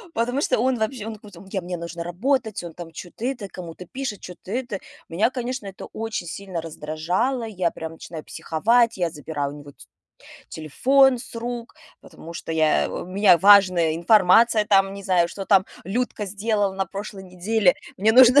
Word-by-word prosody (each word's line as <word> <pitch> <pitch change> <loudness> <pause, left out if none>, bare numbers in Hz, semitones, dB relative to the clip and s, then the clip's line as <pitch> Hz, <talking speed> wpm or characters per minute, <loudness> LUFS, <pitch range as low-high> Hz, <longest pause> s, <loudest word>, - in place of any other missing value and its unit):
Потому 245 +4 0
что - - +1
он 255 0 +1
вообще, 220 0 -2
он 220 -1 -5
куцо 210 -1 -14
он: - - -14
"Я 190 - -2
мне 180 0 -5
нужно 170 0 -6
работать!" 220 +4 -1
Он 170 -2 -8
там 170 -1 -9
чё-то 175 +7 -9
это, 245 -6 -3
кому-то 180 -1 -9
пишет, 255 -2 -5
чё-то 180 +1 -11
это. 240 -4 -3 0.3
Меня, 185 +8 +1
конечно, 250 -3 -4
это 195 -1 -8
очень 225 -5 -5
сильно 185 0 -5
раздражало. 165 - -2
Я 185 -6 -1
прям 160 0 -7
начинаю 160 -1 -9
психовать, 230 +8 +1
я 175 -3 0
забираю 150 -2 -4
у - - -10
него 145 0 -12
т - - -16 0.6
телефон 255 - +3
с 235 - -11
рук, 235 0 -5 0.3
потому 165 - -12
что 165 - -5
я 155 -1 +2
у - - -5
меня 190 0 +5
важная 185 -4 +5
информация, 215 +4 +5
там 195 -2 +3
не 200 - -8
знаю, 180 -3 +3
что 195 +2 -6
там 190 -1 +4 0.2
Людка 220 +2 -2
сделала 205 0 0
на 195 0 -2
прошлой 200 +1 -7
неделе. 185 +2 +1 0.2
Мне 215 +3 +3
нужно 255 +3 +8
195 Hz, 185 wpm, -23 LUFS, 175-230 Hz, 0.6 s, нужно